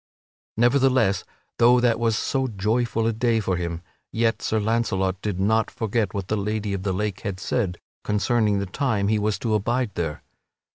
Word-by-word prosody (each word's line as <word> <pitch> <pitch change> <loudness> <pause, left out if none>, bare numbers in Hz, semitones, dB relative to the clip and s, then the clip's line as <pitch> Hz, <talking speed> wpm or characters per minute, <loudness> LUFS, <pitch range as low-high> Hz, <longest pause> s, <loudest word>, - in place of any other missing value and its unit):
Nevertheless, 125 -3 +3 0.4
though 120 +1 +6
that 120 -2 +2
was 115 -2 +1
so 135 +1 0
joyful 115 +2 0
a 115 - +1
day 115 0 +1
for 95 -4 -1
him, 85 -1 -4 0.3
yet 115 0 0
Sir 110 - 0
Launcelot 100 -4 0
did 100 -4 -3
not 110 +3 +2
forget 110 -2 -1
what 100 -2 -4
the 110 - 0
Lady 105 0 -2
of 95 - -3
the 95 0 -1
Lake 100 +1 -2
had 95 -2 -4
said 95 -3 -1 0.3
concerning 105 0 +1
the 100 - -1
time 100 0 0
he 110 0 +2
was 105 0 0
to 115 -2 -1
abide 115 +3 0
there! 80 -4 -3
110 Hz, 180 wpm, -24 LUFS, 100-115 Hz, 0.4 s, though